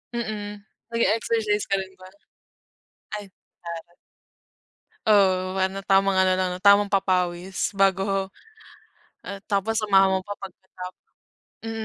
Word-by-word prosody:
Mm. 210 -3 -5 0.3
Nag-eexercise 220 -1 +1
ka 195 - +2
rin 190 0 -6
ba? 185 - -11 1.1
Ay, 205 - -9 0.4
pareho 170 -1 -6
tayo. 175 - -29 1.1
Oo 185 -3 +3
parang 190 +1 -1
tamang 195 0 +4
ano 185 0 +4
lang 185 -1 0
tamang 200 +1 +5
papawis 185 -1 0
bago, 195 0 +2 1.0
ah, 200 -1 -7
tapos 200 +2 +1
samahan 195 -2 +4
mo 190 - +2
pa 205 +2 -7
pagkatap 185 -1 -9 0.7
mm, 225 - -4
195 Hz, 115 wpm, -24 LUFS, 185-205 Hz, 1.1 s, tamang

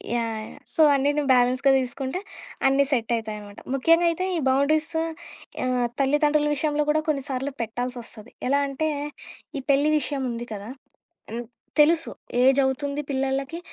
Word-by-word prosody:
Yeah! 225 -2 -3 0.2
So - - +2
అన్ని 275 +1 +2
నువ్వు 295 -2 0
బ్యాలెన్స్‌గా 255 +2 +4
తీసుకుంటే 265 +5 -3 0.5
అన్నీ 270 +1 +4
సెట్ 235 -3 0
అయితాయనమాట. 210 -2 -7
ముఖ్యంగా 330 +6 +4
అయితే 350 +3 -1
ఈ - - 0
బౌండరీసు 310 +4 +2 0.6
ఆహ్, 250 -1 +1
తల్లిదండ్రుల 295 +2 +3
విషయంలో 295 0 0
కూడా 310 +1 +3
కొన్నిసార్లు 275 -1 -2
పెట్టాల్సొస్తది. 240 -1 -5 0.2
ఎలా 280 +1 +3
అంటే, 310 +3 -1 0.7
ఈ 270 - -3
పెళ్లి 285 +2 +3
విషయం 275 0 -3
ఉంది 235 +1 -5
కదా! 205 +1 -7 0.6
హ్మ్. 240 +1 -4 0.3
తెలుసు. 325 +2 +4 0.3
ఏజ్ 265 +2 +5
అవుతుంది 280 +2 -1
పిల్లలకి 270 +4 -1
270 Hz, 135 wpm, -25 LUFS, 245-295 Hz, 0.7 s, ఏజ్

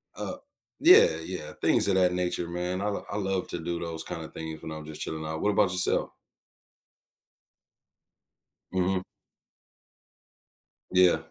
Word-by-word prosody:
Uh, - - -5 0.4
yeah, 430 +9 +7
yeah, - - -6
things - - +3
of 100 - +3
that 90 -1 +4
nature, 90 -1 -1
man. 90 +2 -3
l 105 0 -2
I - - -2
love 95 -2 -1
to - - -4
do 85 +1 -3
those 85 -1 -4
kinda - - -6
things 80 -1 -7
when 80 - -7
I'm 80 -1 -7
just 75 0 -9
chilling 80 0 -4
out. 80 0 -4
What 105 - +2
about 100 -2 +3
yourself? 90 0 +1 2.6
Mhm. 95 0 +1 1.9
Yeah. 90 -2 +5
90 Hz, 140 wpm, -28 LUFS, 80-95 Hz, 2.6 s, yeah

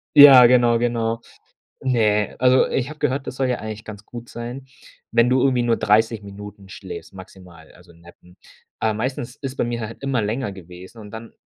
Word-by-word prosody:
Ja, 135 -4 +10
genau, 120 -1 +4
genau. 115 -1 -1 0.6
Ne, 105 -5 +1
also 130 +1 +4
ich 130 0 -2
habe 155 0 -10
gehört, 135 +1 -1
das - - -5
soll 130 -1 0
ja 125 - 0
eigentlich 110 0 -7
ganz 105 -1 -10
gut 120 -1 -10
sein, 120 +3 -8 0.4
wenn 115 +1 +3
du 130 +1 +2
irgendwie 130 -2 +2
nur 120 -1 +1
30 110 +1 +1
Minuten 100 0 -11
schläfst, 95 +1 -9
maximal, 90 -3 -14
also 85 0 -19
nappen. 85 +1 -19 0.4
Ah, 110 - 0
meistens 120 +2 -4
ist 135 -1 -7
bei - - 0
mir 120 0 -3
halt 115 +3 -8
immer 135 -4 -1
länger 110 +1 -3
gewesen 90 +3 -13
und 105 -1 -11
dann 115 +1 -10
115 Hz, 190 wpm, -21 LUFS, 105-125 Hz, 0.6 s, Ja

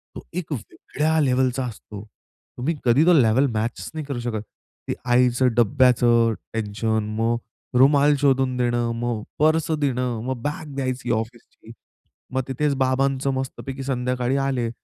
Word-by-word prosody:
तो - - -7
एक 175 -2 -5
वेगळ्या 150 +5 -2
लेव्हलचा 130 -1 +1
असतो. 105 -3 -8 0.5
तुम्ही 145 +7 -1
कधी 130 +6 +4
तो 180 - +6
लेव्हल 130 -2 +4
मॅचेस 110 +2 -3
नाही 155 -2 -5
करू 140 -3 -4
शकत. 120 -3 -3 0.5
ते - - -1 0.2
आईचं 125 +1 +4
डब्ब्याचं 120 -1 +4 0.2
टेन्शन, 110 0 -1
मग 115 +1 +1 0.4
रुमाल 145 +2 +5
शोधून 135 -2 +2
देणं, 120 -1 0
मग 115 -2 -2 0.2
पर्स 155 +1 +2
देणं, 125 -6 -1
मग 130 -2 -3
बॅग 150 +1 -5
द्यायची 130 -2 -2
ऑफिसची. 115 0 -5 0.6
मग 130 - +1
तिथेच 140 +2 0
बाबांचं 135 +1 +1
मस्तपैकी 135 +1 -5
संध्याकाळी 125 0 -1
आले. 130 -4 -1
130 Hz, 135 wpm, -23 LUFS, 120-140 Hz, 0.6 s, तो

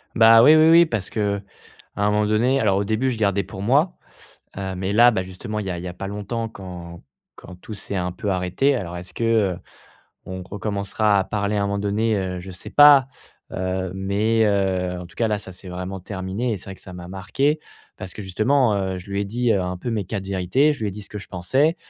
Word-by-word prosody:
Bah, 115 0 +8
oui, 155 +3 +8
oui, 155 +1 +6
oui 170 +1 +7
parce 110 - -3
qu'à - - -3 0.8
un 105 0 +1
moment 105 0 +2
donné 120 +6 +2
alors 100 -5 +2
au 100 - +1
début 110 +6 0
je 115 - -4
gardais 100 -2 +1
pour 95 0 -9
moi, 145 - +2 0.6
heu, 95 -1 -3
mais 95 +2 -2
là, 120 +2 +7
ben, 95 -4 -1
justement 105 +4 -6
il 105 - -4
y - - -3
a 90 - -4
il 85 - -7
y 90 - -5
a 90 - -6
pas 95 - -6
longtemps 105 +3 -4
quand 90 -4 -10 0.3
quand 90 - -12
tout 105 +4 -10
s'est 100 0 -6
un 90 0 -1
peu 100 +3 -4
arrêté. 90 +10 +1
Alors 90 -8 -4
est-ce 90 +1 -9
que, 115 - -4
heu, 110 -6 +2 0.7
on 95 0 -6
recommencera 100 +1 0
à 95 - +1
parler 105 0 -1
à 100 - +1
un - - 0
moment 100 0 -1
donné, 105 +2 0
heu, 95 -2 -3
je 95 +2 -9
sais 90 - -10
pas, 145 -3 +7 0.4
heu, 95 0 -2
mais, 105 +4 +1
heu, 95 -3 0
en 90 - -8
tout - - -19
cas 115 - +1
là, 105 -1 0
ça 95 - -10
c'est 90 +1 -12
vraiment 90 +2 -5
terminé 95 +5 -3
et 105 - -1
c'est 90 - -11
vrai 95 - -7
que - - -18
ça 95 - -11
m'a 90 -1 -9
marqué 135 - 0 0.4
parce 95 -1 -7
que 105 - -8
justement, 110 +5 +2
heu, 95 -1 -2
je 95 +2 -12
lui 100 - -1
ai 100 - -1
dit, 120 +4 -1
heu, 100 - +1
un 90 0 -3
peu 105 +7 -5
mes 105 -4 -1
quatre 100 -2 -5
vérités, 100 - +2
je 145 - -7
lui 105 - -1
ai - - -3
dit 105 - -8
ce - - -11
que 105 - -7
je 100 - -10
pensais 130 - +1
100 Hz, 250 wpm, -22 LUFS, 95-115 Hz, 0.8 s, Bah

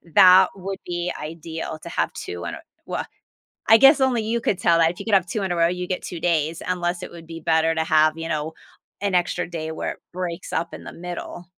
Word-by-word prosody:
that 185 -1 +8
would 195 0 -5
be 175 0 -2
ideal 160 +1 -6
to - - -7
have - - -1
2 90 0 -6
in - - -4
a - - -10 0.3
well, - - -3 0.6
I 225 - +9
guess 275 +3 +7
only 250 -4 +2
you 230 +2 -1
could 200 - 0
tell 170 -3 +4
that. 165 0 +5
If 175 - -14
you - - -7
could 220 - -1
have 190 -2 +4
2 200 +4 -2
in 190 - -2
a - - 0
row, 170 0 +4
you'd 180 +1 -3
get 185 - -2
2 175 - -6
days, 160 -1 0
unless 175 -1 -1
it - - -7
would 170 -1 -11
be 165 0 -7
better 160 +1 +2
to 160 - +1
have, 155 0 +3
you 165 - -4
know, 155 0 -2 0.5
an 200 -2 -1
extra 175 0 0
day 160 -2 -4
where 160 - -3
it - - -22
breaks 180 -1 -5
up 165 +1 -2
in - - -8
the - - -9
middle. 175 0 -7
175 Hz, 250 wpm, -23 LUFS, 165-185 Hz, 0.6 s, I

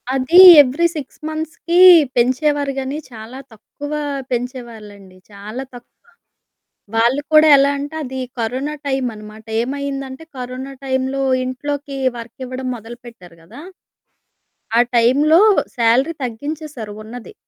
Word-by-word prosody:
అది 265 +7 +1 0.2
ఎవ్రీ 285 +5 0
6 285 -4 -8
మంత్స్‌కి 320 +2 -2 0.4
పెంచేవారు 275 +3 0
గానీ, 270 +2 -4
చాలా 230 +3 -10
తక్కువ 290 +6 -10 0.4
పెంచేవాళ్ళండి 225 -6 -7
చాలా 210 +6 -8
తక్కువ. 245 0 -14 1.0
వాళ్ళు 240 +5 +2
కూడా 310 0 +7
ఎలా 275 +1 +3
అంటే 290 +3 -6
అది 260 0 -6 0.2
కరోనా 255 +6 -3
టైమన్నమాట. 220 -5 -5 0.2
ఏమైందంటే 275 +2 -5
కరోనా 255 +2 -7
టైంలో 265 +1 -2 0.2
ఇంట్లోకి 280 +2 -5 0.2
వర్క్ 230 +1 -11
ఇవ్వడం 255 +1 -6
మొదలుపెట్టారు 230 -6 -13
కదా! 175 - -13 1.2
ఆ - - +6 0.2
టైంలో 290 +9 +4 0.4
సాలరీ 245 +7 +2
తగ్గించేశారు 275 -2 -7
ఉన్నది. 240 - -11
260 Hz, 105 wpm, -18 LUFS, 235-285 Hz, 1.2 s, కూడా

